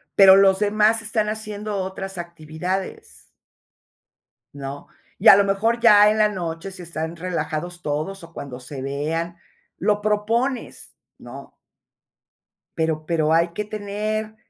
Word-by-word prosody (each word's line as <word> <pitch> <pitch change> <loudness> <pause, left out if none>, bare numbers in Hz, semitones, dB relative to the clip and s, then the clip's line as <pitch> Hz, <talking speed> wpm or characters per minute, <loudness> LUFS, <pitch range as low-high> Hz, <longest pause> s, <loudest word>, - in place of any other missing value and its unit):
Pero 190 -1 +9
los 195 -1 +5
demás 215 +2 +3
están 215 -1 -1
haciendo 215 -1 -5
otras 190 0 -5
actividades, 170 +2 -6 1.2
¿no? 140 0 -7 0.3
Y, - - +2
a - - +11
lo 200 - +4
mejor, 205 +4 0
ya 210 -3 +7
en 215 - +1
la 215 -1 +4
noche, 175 -1 -5
si 185 -1 -10
están 160 0 -5
relajados 175 0 -4
todos 155 +5 -3
o 165 0 -13
cuando 130 -5 -8
se 130 +2 -8
vean, 160 +5 -3 0.4
lo 210 -1 +1
propones, 225 +5 -2 0.2
¿no? - - -12 1.2
Pero 160 -1 -1
pero 160 -1 +1
hay 170 +1 +3
que 210 +5 -3
tener 215 +1 -4
190 Hz, 135 wpm, -22 LUFS, 165-210 Hz, 1.2 s, a